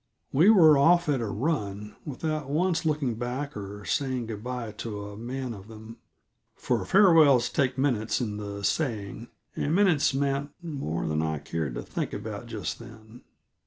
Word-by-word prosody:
We 165 +9 +6
were 160 -9 +7
off 170 +4 +5
at 135 -4 +1
a 115 - -2
run, 105 -4 -2
without 150 0 -3
once 165 +2 +1
looking 145 -5 0
back 130 +4 -4
or 105 0 -7
saying 130 -4 -1
good 110 -2 -6
by 125 -3 -4
to 105 -1 -6
a - - -10
man 125 +3 -5
of 100 -1 -11
them; 110 +1 -11 0.6
for - - -1
farewells 160 - +6
take 130 -3 0
minutes 120 -5 +1
in 105 -4 -3
the 100 -1 -6
saying, 115 -5 -2 0.3
and 150 +3 0
minutes 180 -7 +4
meant 140 +1 -1
more 140 - -4
than 75 0 0
I 80 -1 -1
cared 75 -4 -4
to - - -4
think - - -4
about - - -6
just - - -4
then. 110 +1 -13
125 Hz, 165 wpm, -27 LUFS, 105-145 Hz, 0.6 s, were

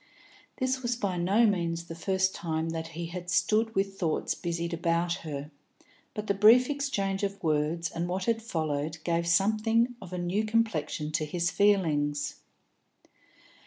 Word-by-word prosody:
This 260 0 0
was 240 -1 0
by 200 -6 -2
no 195 +7 +3
means 170 -5 0
the 170 - -8
first 190 +2 0
time 160 -1 -2
that 165 0 -4
he 170 - -3
had 175 +1 -6
stood 215 +5 +2
with 195 0 -1
thoughts 165 -4 0
busied 170 0 -3
about 170 +1 +1
her, 150 -2 -6 0.6
but 210 - -4
the 200 - +1
brief 230 +7 +6
exchange 205 -9 -1
of 200 -1 -3
words 160 +2 0
and 170 +1 -2
what 185 +1 -2
had 230 -1 +1
followed 155 -7 -2
gave 170 0 0
something 220 +6 +3
of 185 -2 -10
a 180 - -4
new 180 +4 0
complexion 215 -9 0
to 155 - 0
his 175 +3 -1
feelings. 150 -8 +2
180 Hz, 160 wpm, -29 LUFS, 165-210 Hz, 0.6 s, brief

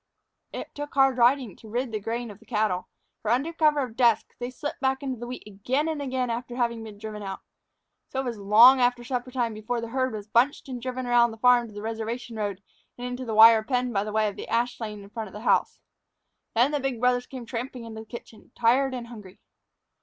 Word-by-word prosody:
It - - -7
took 290 0 -7
hard 270 -2 +4
riding 245 -3 +3
to 220 - -13
rid 245 +2 -2
the 215 - -2
grain 230 +2 -4
of 200 - -14
the 225 - -20
cattle, 210 -6 0 0.3
for, 215 - -3
under 270 +8 +1
cover 305 -3 +3
of 255 - -2
the - - -15
dusk, 235 -3 +3
they 245 0 -3
slipped 290 +3 -6
back 265 0 0
into 260 -4 -3
the 240 - -6
wheat 250 - -7
again 245 +9 -1
and 315 -2 -2
again 255 -3 -1
after 240 +1 -4
having 235 -2 -1
been 215 -2 -10
driven 210 0 -7
out. 195 -1 -6 0.7
So 265 - -2
it - - -6
was 235 -4 -4
long 230 +6 +7
after 245 0 +2
supper 250 0 -3
time 240 -3 -1
before 215 +3 -3
the 230 0 -5
herd 255 0 0
was 205 -1 -6
bunched 245 +7 +2
and 250 -2 -6
driven 255 +1 -4
around 240 -1 +4
the 225 - -9
farm 245 0 +4
to 215 - -13
the 205 - -6
reservation 225 +1 -4
road 200 -2 -3 0.3
and 245 - -6
into 250 +1 -4
the 225 -2 -3
wire 225 0 +9
pen 245 +2 -1
by 200 -1 +1
way 215 0 +1
of 205 - -5
the - - -7
ash 240 +2 0
lane 210 -3 -6
in 200 - -13
front 225 -1 -5
of 190 - -14
the 210 - -8
house. - - +2 0.8
Then 245 +5 +4
the 295 - 0
big 270 -3 -2
brothers 250 0 +2
came 255 -3 -8
tramping 245 +1 -5
into 220 -1 -7
the 220 - -13
kitchen, 235 -1 -11
tired 255 +3 +3
and 245 -2 -5
hungry. 210 -6 -12
240 Hz, 240 wpm, -26 LUFS, 220-255 Hz, 0.8 s, wire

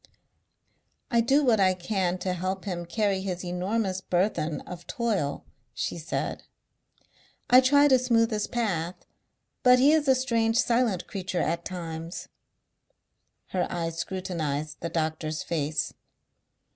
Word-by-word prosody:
"I 235 -1 +4
do 275 +5 +3
what 230 -4 +4
I 185 -1 +4
can 185 -1 -1
to 185 - +1
help 185 +2 -3
him 175 -3 -4
carry 200 0 0
his 185 -1 -4
enormous 190 +2 -1
burthen 175 -4 0
of 175 -1 -10
toil," 215 - -1 0.3
she - - -3
said. 160 - -3 1.1
"I 250 +1 +9
try 285 +3 +5
to 260 -2 +5
smooth 235 -2 +2
his 210 -1 -1
path. 185 -8 -1 0.7
But 250 0 +7
he 270 +4 +5
is 310 -2 +2
a 265 - +6
strange 230 -3 +1
silent 230 -7 +2
creature 190 -3 -3
at 170 +2 -1
times." 165 -2 -6 1.2
Her 180 -1 0
eyes 165 -1 -3
scrutinized 155 -6 -3
the 170 - -4
doctor's 155 -1 -2
face. 150 -2 -1
185 Hz, 130 wpm, -27 LUFS, 170-230 Hz, 1.2 s, I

